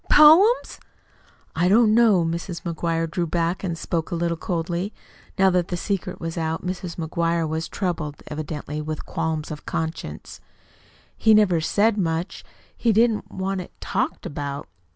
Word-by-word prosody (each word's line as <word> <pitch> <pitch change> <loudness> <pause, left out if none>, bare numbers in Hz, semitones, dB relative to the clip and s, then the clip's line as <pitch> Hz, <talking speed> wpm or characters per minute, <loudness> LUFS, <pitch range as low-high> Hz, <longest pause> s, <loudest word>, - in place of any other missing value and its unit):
Poems?" 340 +11 +6 0.8
"I 175 +2 +2
don't 215 +1 +5
know." 215 -7 +5
Mrs. 170 +1 -4
McGuire 165 -1 -1
drew 170 +1 -2
back 170 +3 -1
and 170 -3 -2
spoke 165 0 -2
a - - -2
little 170 0 0
coldly. 175 +4 -3 0.4
Now 190 -1 +5
that 180 -1 +1
the 175 - -3
secret 195 +1 -3
was 165 0 -4
out, 160 +1 -2
Mrs. 180 -1 -4
McGuire 165 0 0
was 160 +2 -3
troubled 165 -6 -3
evidently 150 0 -5
with 155 0 -5
qualms 160 -2 -2
of 150 -1 -8
conscience. 160 - -5 0.7
"He 220 -1 +5
never 185 -6 +4
said 210 +6 +2
much. 165 -1 -2 0.3
He 235 - +2
didn't 225 0 +2
want 190 0 -2
it - - -13
talked - - -2
about." 145 -1 -5
170 Hz, 150 wpm, -23 LUFS, 160-190 Hz, 0.8 s, Poems